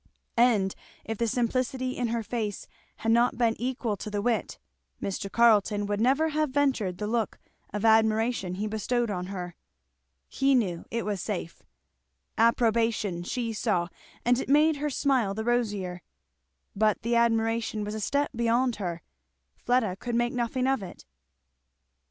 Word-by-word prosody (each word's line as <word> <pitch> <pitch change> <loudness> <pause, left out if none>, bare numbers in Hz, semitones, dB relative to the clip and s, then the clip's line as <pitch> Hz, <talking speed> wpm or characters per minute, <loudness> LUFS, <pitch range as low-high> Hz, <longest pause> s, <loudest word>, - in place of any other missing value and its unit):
And 220 -6 +3 0.3
if 225 -1 -4
the 235 - +1
simplicity 255 +2 0
in 245 - -1
her 230 0 -1
face 215 -3 -3 0.3
had 225 - -1
not 235 +1 +3
been 235 -2 +3
equal 245 -3 -1
to 210 - -6
the 205 -1 -2
wit, 230 +2 -1 0.4
Mr. 195 0 -4
Carleton 210 -2 +4
would 205 +1 -1
never 275 +7 +3
have 305 -1 0
ventured 260 -10 0
the 210 - -3
look 225 0 -1 0.3
of 210 +1 -2
admiration 220 -3 +3
he 205 +3 -3
bestowed 220 +2 -1
on 180 -2 -3
her. 180 -3 -6 0.7
He 275 0 +2
knew 185 -9 0
it 230 0 -2
was 205 -3 -2
safe. 180 -5 -5 0.7
Approbation 225 -5 +2
she 230 +5 -3
saw, 195 -6 0 0.4
and 245 +1 +3
it - - -4
made 300 +2 +4
her 295 +1 -1
smile 255 -8 +1
the 220 - -3
rosier; 205 -7 -1 0.7
but 215 +1 +2
the 235 +1 +1
admiration 225 -1 +1
was 210 +1 -4
a 220 - -4
step 285 +7 0
beyond 235 +1 +1
her; 175 -4 -4 0.5
Fleda 235 -7 0
could 240 +3 -4
make 240 0 +1
nothing 250 +1 -1
of 270 -3 +1
it. 185 - -10
225 Hz, 155 wpm, -27 LUFS, 205-245 Hz, 0.7 s, Carleton